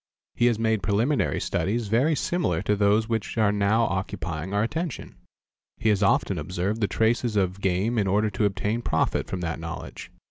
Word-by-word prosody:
He 120 - +2
has 120 -3 +2
made 110 -2 +1
preliminary 110 +9 +1
studies 105 +7 -1
very 130 +9 +2
similar 145 - -1
to 105 - +1
those 105 +2 +2
which 115 0 -3
are 110 -2 +3
now 105 +3 +2
occupying 95 -4 -3
our 100 +1 +1
attention. 155 +3 -4 0.6
He 110 - +1
has 105 -1 +2
often 95 -2 +2
observed 95 +7 -2
the 105 - +2
traces 115 +1 +1
of 95 -1 0
game 95 +6 +1
in 100 - +1
order 105 +2 +1
to 105 +2 0
obtain 105 +3 -1
profit - - 0
from 95 - -4
that 80 -1 -3
knowledge. 80 -1 -7
105 Hz, 180 wpm, -25 LUFS, 95-115 Hz, 0.6 s, are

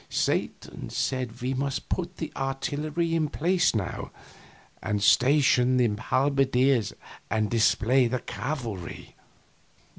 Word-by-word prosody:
Satan - - -2
said 125 -3 -3
we 130 +1 0
must 135 +1 -3
put 180 0 -3
the 160 - -5
artillery 145 +5 -2
in 160 -2 +1
place 175 -1 +1
now, 95 -4 -3 0.7
and 105 -1 -1
station 130 0 +4
the 120 -2 +3
halberdiers 135 -3 +2 0.4
and 110 -1 0
display 120 +2 +3
the 125 +2 -1
cavalry. 120 - -6
130 Hz, 110 wpm, -26 LUFS, 120-145 Hz, 0.7 s, station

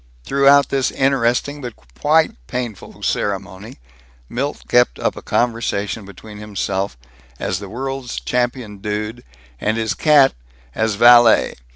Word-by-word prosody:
Throughout 140 - +4
this 135 -2 +1
interesting 135 +2 0
but 120 -4 -7
quite 145 - +1 0.2
painful 120 -6 -6
ceremony 100 0 -3 0.5
Milt 140 +4 -4
kept 120 0 +3
up - - -1
a - - -9
conversation 115 -3 -1
between 105 +2 -12
himself 100 - -3 0.4
as 90 - -2
the 100 -1 -9
World's 135 +2 -5
Champion 120 -4 -2
Dude, 105 +3 -4 0.4
and 110 +2 -1
his 110 -1 -1
cat 145 -3 +4 0.4
as 110 +3 0
Vallay. 120 +1 +6
115 Hz, 120 wpm, -19 LUFS, 105-135 Hz, 0.5 s, Vallay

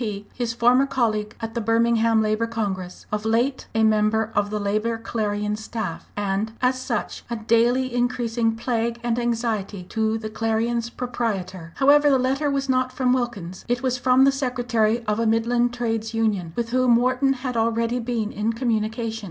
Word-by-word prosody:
P., 205 -3 -4
his 240 -2 -2
former 245 +3 +3
colleague 215 -5 -1
at 225 0 -4
the 235 - -2
Birmingham 225 0 +3
Labour 215 +2 0
Congress, 195 -6 -4
of 210 0 -2
late 235 +5 0
a 225 - +3
member 220 0 +2
of 205 0 +1
the 210 0 -2
Labour 215 +3 0
Clarion 210 -2 -2
staff, 215 -5 -5
and 205 +2 -1
as 255 0 +1
such 235 -4 -3
a 235 - -2
daily 235 +3 +2
increasing 240 -2 0
plague 235 0 -1
and 240 0 0
anxiety 225 -5 -2
to 220 0 0
the 220 -1 -5
Clarion's 225 +1 -1
proprietor. 195 -9 -4
However, 290 +2 +5
the 270 - +4
letter 270 +3 0
was 275 0 -1
not 255 -1 +1
from 255 -1 +1
Wilkins. 210 -8 -3
It 245 +1 -1
was 255 -1 0
from 255 +1 +4
the 275 - +6
secretary 245 -4 0
of 210 0 0
a 230 - +1
Midland 235 +2 +2
trades 225 -2 -2
union, 205 -7 0
with 235 -1 -2
whom 255 -1 +4
Wharton 255 +3 +2
had 255 -1 -5
already 230 +1 +1
been 230 -2 -2
in 215 +2 -1
communication. 225 -1 -1
230 Hz, 175 wpm, -23 LUFS, 215-245 Hz, -, the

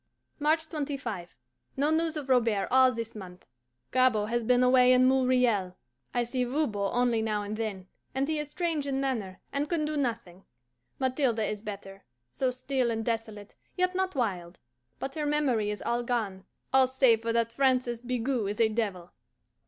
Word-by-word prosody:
March 315 +2 +2
25. 275 - -5 0.4
No 290 +3 +2
news 325 0 +1
of 290 -3 -5
Robert 230 -6 +2
all 260 0 +6
this 230 -2 -5
month. 185 -3 -10 0.5
Gabord 235 -5 +3
has 240 0 0
been 250 +2 +3
away 250 0 +6
in 255 0 +5
Montreal. 250 -8 +2 0.3
I 245 - +1
see 250 +2 -1
Voban 240 -7 -1
only 245 -2 +2
now 215 -2 -1
and 205 +1 -4
then, 210 -4 -4 0.3
and 270 +1 0
he 310 -1 -1
is 300 -1 -4
strange 315 -3 -2
in 270 -1 -1
manner, 225 -9 -3
and 285 +1 -1
can 330 -3 0
do 305 0 -2
nothing. 230 -9 -3 0.5
Mathilde 260 -2 +1
is 210 -1 -2
better 195 -2 -8 0.3
so 255 - 0
still 255 0 -1
and 225 -1 -2
desolate, 220 -3 -4 0.2
yet 365 0 +2
not 375 -2 -1
wild; 185 -8 -2 0.4
but 270 - -5
her 300 -1 -2
memory 265 -8 +1
is 210 - -4
all 240 +1 0
gone, 220 -6 -2 0.3
all 265 -1 +6
save 255 -3 +3
for 230 0 -1
that 230 0 +1
"Francois 255 -1 +1
Bigot 245 -3 -1
is 205 - -5
a 225 -1 +4
devil." 200 -6 -3
245 Hz, 175 wpm, -28 LUFS, 215-270 Hz, 0.5 s, all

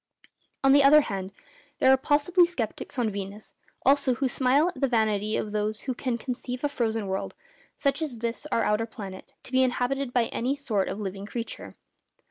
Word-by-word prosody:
On 270 - +6
the 285 0 +6
other 300 +2 +8
hand, 195 -6 -4 0.5
there 260 - +5
are - - +8
possibly 295 +6 +3
sceptics 270 -4 -4
on 235 -3 +1
Venus 200 +1 -7 0.3
also 275 -1 +4
who 270 - 0
smile 270 +6 +3
at 360 - -9
the 275 - +4
vanity 215 -3 +1
of 210 - -3
those 210 0 -2
who 260 - -3
can 250 -1 -2
conceive 250 +1 -5
a 290 - +2
frozen 225 -5 -1
world, 190 0 -3 0.4
such 280 +2 0
as 290 -7 -3
this 235 +5 -4
our 230 - +2
outer 215 +2 +1
planet, 195 -5 -9
to - - -12
be 260 0 +4
inhabited 255 +1 0
by 245 -2 +2
any 255 +4 -1
sort 220 -9 -1
of 205 - -4
living 195 0 -5
creature. 230 +1 -6
245 Hz, 190 wpm, -27 LUFS, 215-275 Hz, 0.5 s, other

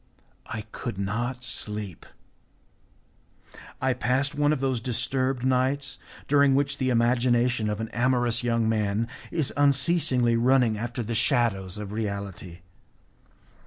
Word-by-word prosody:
I 110 - -4
could 120 -6 -5
not 120 +6 -3
sleep. 105 -5 -3 1.7
I 130 0 +1
passed 125 +4 0
one 145 0 +2
of 155 - 0
those 130 -3 -1
disturbed 130 +2 -1
nights 130 +2 0 0.3
during 140 -1 +4
which 140 +1 0
the 130 -1 +1
imagination 120 -1 +2
of 105 0 -3
an 110 0 -4
amorous 120 -1 +1
young 115 -2 +1
man 110 0 0 0.2
is 155 -6 -1
unceasingly 140 -4 +3
running 125 -2 +3
after 120 +2 -4
the 115 - -4
shadows 110 - +1
of 105 -1 -6
reality. 100 -5 -5
120 Hz, 125 wpm, -26 LUFS, 110-130 Hz, 1.7 s, during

